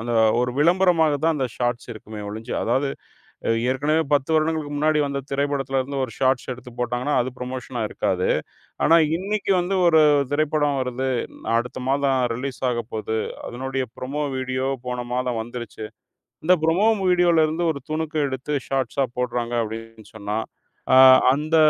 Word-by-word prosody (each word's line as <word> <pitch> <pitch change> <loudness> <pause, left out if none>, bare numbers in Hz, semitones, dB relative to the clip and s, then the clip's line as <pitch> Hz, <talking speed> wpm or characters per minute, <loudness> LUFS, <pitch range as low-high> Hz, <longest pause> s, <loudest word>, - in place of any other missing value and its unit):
அந்த 120 +1 -3 0.3
ஒரு 125 0 0
விளம்பரமாக 165 -1 +4
தான் 165 0 +3
அந்த 135 -3 0
ஷாட்ஸ் 120 0 -2
இருக்குமே 110 -1 -9
ஒழிஞ்சு, 110 +3 -6
அதாது 135 +4 +1 0.6
அ - - +3 0.2
ஏற்கனவே 150 +5 +1
10 140 0 +1
வருடங்களுக்கு 155 -1 0
முன்னாடி 155 +1 +2
வந்த 140 0 -3
திரைப்படத்துல 140 -1 0
இருந்து 135 +1 -3
ஒரு 115 - -12
ஷாட்ஸ் 130 -1 +1
எடுத்து 125 0 -12
போட்டாங்கன்னா, 125 +4 -1
அது 130 +2 -4
ப்ரமோஷனா 125 -1 -4
இருக்காது. 90 -1 -1 0.6
ஆனா 165 +2 +6 0.2
இன்னிக்கு 200 +1 -1
வந்து 185 +2 -1
ஒரு 160 -2 +6 0.3
திரைப்படம் 145 -1 +1
வருது, 130 +1 -2 0.5
அடுத்த 120 +2 -4
மாதம் 135 -1 +2 0.2
ரிலீஸ் 130 +2 -5
ஆகப்போது, 110 -2 -3 0.3
அதனுடைய 130 +1 -3
ப்ரோமோ 140 +4 -3
வீடியோ 130 0 -2 0.2
போன 125 0 -3
மாதம் 125 -2 -1
வந்துருச்சு. 115 -2 -7 0.6
இந்த 180 +3 +6
ப்ரோமோ 175 +7 +3 0.2
வீடியோல 175 -3 +4
இருந்து 160 +3 -2
ஒரு 140 - -8
துணுக்கு 155 0 -3
எடுத்து 130 +3 -4 0.2
ஷார்ட்ஸா 135 0 0
போடுறாங்க 120 -1 -2
அப்டின்னு 115 0 -9
சொன்னா, 105 0 -3 0.6
அ - - +7 0.4
அந்த 155 +4 0
135 Hz, 145 wpm, -23 LUFS, 120-155 Hz, 0.6 s, அ